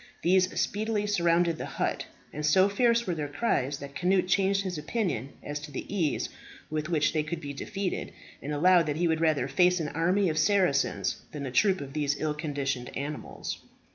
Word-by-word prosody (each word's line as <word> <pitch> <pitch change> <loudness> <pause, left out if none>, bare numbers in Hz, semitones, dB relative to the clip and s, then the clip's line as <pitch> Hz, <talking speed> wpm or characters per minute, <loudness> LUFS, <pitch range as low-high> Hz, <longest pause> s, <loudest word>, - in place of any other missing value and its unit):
These 185 +1 +3
speedily 210 0 0
surrounded 170 -4 +2
the - - -4
hut, - - -1 0.3
and 150 - -4
so 185 +6 +5
fierce 235 +3 +2
were 180 - -1
their 150 -3 -3
cries, 145 - 0
that 140 0 -9
Cnut 185 +2 +2
changed 195 +1 +2
his 180 -5 -3
opinion 150 - -2
as 145 0 -4
to 150 0 -9
the 135 - -5
ease 165 -7 0 0.4
with 155 +1 -2
which 155 -3 +2
they 155 - +2
could 155 +2 -4
be 145 -2 -6
defeated, 195 +5 -3 0.3
and 145 - -5
allowed 170 +2 +4
that 150 0 -1
he 175 +1 +2
would 160 0 +1
rather 155 -3 +2
face 180 0 +3
an 155 -2 -2
army 180 +6 +2
of 155 -1 0
Saracens 180 -6 +2 0.2
than 145 -2 -4
a 130 - -4
troop 190 +8 +3
of 135 -1 -7
these 145 -1 0
ill 155 -1 0
conditioned 140 -5 -3
animals. 145 +2 -5
165 Hz, 195 wpm, -28 LUFS, 145-190 Hz, 0.4 s, so